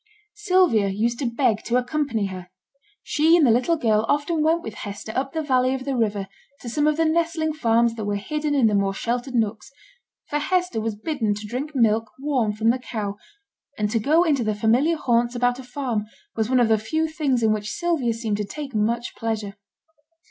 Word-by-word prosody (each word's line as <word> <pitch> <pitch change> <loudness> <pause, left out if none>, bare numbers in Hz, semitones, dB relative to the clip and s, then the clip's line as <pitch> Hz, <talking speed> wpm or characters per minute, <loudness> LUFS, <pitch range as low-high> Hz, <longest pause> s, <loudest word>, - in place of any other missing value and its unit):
Sylvia 365 - +3
used 225 +5 -1
to 260 - 0
beg 235 -3 +1
to 240 - +1
accompany 250 -4 -1
her; 185 -2 -7 0.5
she 320 +3 +4
and 320 - +4
the 240 - +5
little 255 +9 +2
girl 220 -6 +2
often 295 +3 +1
went 325 +2 +2
with 220 - -6
Hester 205 +1 -6
up 265 +1 -2
the 320 -1 -2
valley 255 -2 +2
of 260 -1 -6
the 275 -1 -1
river 205 -4 -1 0.3
to 240 - -6
some 295 +5 +1
of 305 0 +2
the 325 - +2
nestling 320 -1 0
farms 235 -5 +2
that 220 -2 -5
were 205 0 -1
hidden 295 +8 -2
in 265 -4 +4
the 215 - +3
more 195 -1 +1
sheltered 245 +4 -3
nooks 220 -2 -1 0.6
for 295 - -1
Hester 360 -5 0
was 220 -1 -2
bidden 220 -3 -1
to 210 +1 -7
drink 270 +7 -5
milk 225 -2 +2
warm 265 -6 0
from 220 +2 +2
the 255 - -2
cow; 210 -5 -4 0.6
and 210 -1 -1
to 230 - +1
go 310 +10 +3
into 290 -7 +1
the 215 -1 -1
familiar 245 +10 +2
haunts 240 -3 +1
about 245 +1 +1
a - - -8
farm 245 -5 -3 0.3
was 220 0 -1
one 255 -1 +3
of 235 -2 +3
the 220 -1 +4
few 315 +9 -1
things 290 -7 0
in 220 -1 +4
which 210 0 -3
Sylvia 330 -9 0
seemed 225 -2 -2
to 210 - -2
take 275 +6 -7
much 230 +3 -1
pleasure. 220 -3 -3
240 Hz, 210 wpm, -23 LUFS, 220-295 Hz, 0.6 s, the